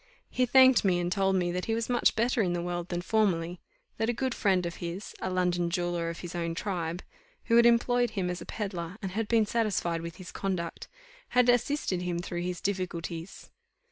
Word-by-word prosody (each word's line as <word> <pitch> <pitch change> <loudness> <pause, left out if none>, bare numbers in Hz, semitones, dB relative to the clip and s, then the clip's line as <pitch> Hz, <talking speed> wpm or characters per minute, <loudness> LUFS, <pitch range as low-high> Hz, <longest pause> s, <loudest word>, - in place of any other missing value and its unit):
He 250 0 +1
thanked 260 0 +6
me, 185 -3 +3
and 175 0 -1
told 195 0 +2
me 175 -2 +1
that 180 +1 -2
he 225 - 0
was 230 0 -2
much 245 -1 +2
better 235 +1 +2
in 180 -4 +1
the 175 - -1
world 175 0 -3
than 175 0 -2
formerly; 180 -5 +1 0.4
that 225 +1 0
a - - +2
good 260 +1 -1
friend 190 -6 +2
of 170 - -4
his, 175 +3 -6
a 190 - -1
London 180 -1 +1
jeweller 175 -1 -1
of 170 - -6
his 175 -1 -7
own 170 -1 -2
tribe, 175 -2 -3 0.4
who 230 - +2
had 235 0 +7
employed 245 +1 +3
him 195 -4 -2
as 180 0 -3
a - - -7
pedlar, 190 -3 -4
and 190 - -3
had 215 +3 -2
been 225 -1 +3
satisfied 205 -7 0
with 170 0 -7
his 185 - -10
conduct, 185 -4 -3 0.5
had 250 0 +6
assisted 245 -6 +1
him 180 -1 -2
through 175 0 -4
his 180 -1 -3
difficulties. 180 -2 -4
185 Hz, 210 wpm, -29 LUFS, 175-225 Hz, 0.5 s, had